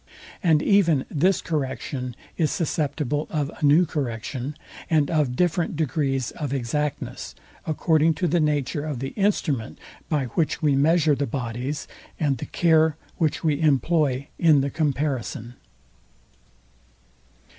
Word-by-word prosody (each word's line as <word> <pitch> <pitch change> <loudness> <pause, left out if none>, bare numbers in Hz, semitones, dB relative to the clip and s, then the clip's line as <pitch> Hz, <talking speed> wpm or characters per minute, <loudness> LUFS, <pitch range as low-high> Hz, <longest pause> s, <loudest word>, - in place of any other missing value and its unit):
And 160 -6 +3
even 170 -9 +3
this 180 +5 +2
correction 130 -4 -3 0.2
is 155 -3 +1
susceptible 150 -2 -1
of 150 -1 -2
a - - -5
new 150 +5 +6
correction, 130 -1 -4 0.3
and 150 -3 +2
of 150 -6 +1
different 175 +1 +1
degrees 135 -4 -1
of 145 -4 -5
exactness, 140 +4 -3 0.3
according 160 0 +2
to 175 +4 0
the 170 +2 +2
nature 145 -2 0
of 150 -4 -3
the 135 +2 -3
instrument, 160 - -1 0.3
by 150 -4 +1
which 155 +6 -1
we 150 -3 +2
measure 155 +2 +4
the 140 0 -1
bodies, 125 +3 -4 0.3
and 140 -5 +1
the - - -5
care 160 -2 +3 0.2
which 160 0 0
we 155 -2 +1
employ 145 -2 +2
in 155 -5 +5
the 140 0 -2
comparison. 140 -5 -2
150 Hz, 130 wpm, -24 LUFS, 135-160 Hz, 0.3 s, new